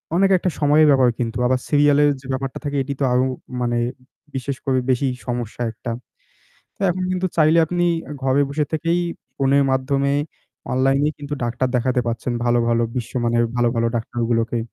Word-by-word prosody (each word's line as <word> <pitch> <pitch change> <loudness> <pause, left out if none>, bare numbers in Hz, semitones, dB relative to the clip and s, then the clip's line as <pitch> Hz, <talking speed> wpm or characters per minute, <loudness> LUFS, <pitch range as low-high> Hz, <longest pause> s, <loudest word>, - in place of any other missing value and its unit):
অনেক 195 +2 +4
একটা 180 - -1
সময়ের 150 +1 +5
ব্যাপার 130 -3 +5
কিন্তু। 115 -1 -2
আবার 130 0 +2
সিরিয়ালে 145 0 +4 0.2
যে - - -18
ব্যাপারটা 130 0 -3
থাকে, 145 -1 -2
এটি 140 +1 -4
তো 140 - 0
আরো 125 +1 +3 0.4
মানে 120 -1 0 0.6
বিশেষ 135 +1 -3
করে 130 -1 +1
বেশি 130 +2 +2 0.2
সমস্যা 120 -1 -4
একটা। 115 +2 -6 0.9
তো - - -40
এখন 185 +1 -3
কিন্তু 185 0 0
চাইলে 160 +1 +5
আপনি 175 +2 0 0.4
ঘরে 135 +2 +3
বসে 150 +2 0
থেকেই 165 +2 +1 0.4
ফোনের 140 +1 +3
মাধ্যমে 135 +1 +1 0.6
অনলাইনেই 135 +3 +2
কিন্তু 145 0 -5
ডাক্তার 120 +2 -1
দেখাতে 125 +1 +1
পাচ্ছেন। 120 +1 -2
ভালো 120 0 +3
ভালো, 115 0 +2
বিশ্বমানের 120 -1 0
ভালো, 120 -1 +3
ভালো 115 0 +2
ডাক্তারগুলোকে। 115 0 -1
130 Hz, 165 wpm, -21 LUFS, 120-145 Hz, 0.9 s, সময়ের